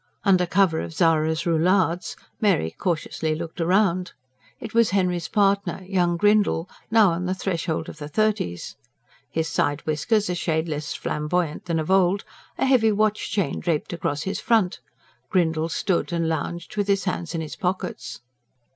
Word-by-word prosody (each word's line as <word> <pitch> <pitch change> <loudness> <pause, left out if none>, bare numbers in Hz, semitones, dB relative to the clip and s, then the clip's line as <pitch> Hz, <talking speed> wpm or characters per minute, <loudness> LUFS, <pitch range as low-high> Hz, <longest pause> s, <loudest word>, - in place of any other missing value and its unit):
Under 185 -3 +3
cover 180 -3 +3
of 165 - -6
Zara's 160 -2 +2
roulades 175 +1 +1 0.3
Mary 190 - +2
cautiously 160 - -2
looked 165 +1 -7
round. 180 +1 +2 0.5
It 225 - -8
was 230 -1 +4
Henry's 180 -3 0
partner 200 -2 +1
young 175 -3 +1
Grindle, 205 -3 +3 0.2
now 220 -4 +5
on 175 +2 -2
the 185 - -1
threshold 170 -4 -2
of - - -9
the 145 - -6
thirties. 210 - -1 0.5
His 160 0 -1
side 145 -2 0
whiskers 205 +8 +1
a 180 - -1
shade 160 -2 -1
less 150 -1 -4
flamboyant 150 +1 -2
than 170 -2 -1
of 160 +3 -2
old, 190 +1 +3 0.3
a - - +1
heavy 245 -5 +4
watch 215 0 0
chain 195 -8 -1
draped 165 -1 -1
across 150 -3 -2
his 195 - -3
front, 220 -6 +1 0.5
Grindle 165 -3 +1
stood 175 +1 -1
and 170 -1 0
lounged 165 +2 -3
with 205 -1 0
his 195 -1 +2
hands 175 -2 -3
in 165 - -1
his 155 - -6
pockets. 180 - -4
175 Hz, 160 wpm, -24 LUFS, 160-195 Hz, 0.5 s, now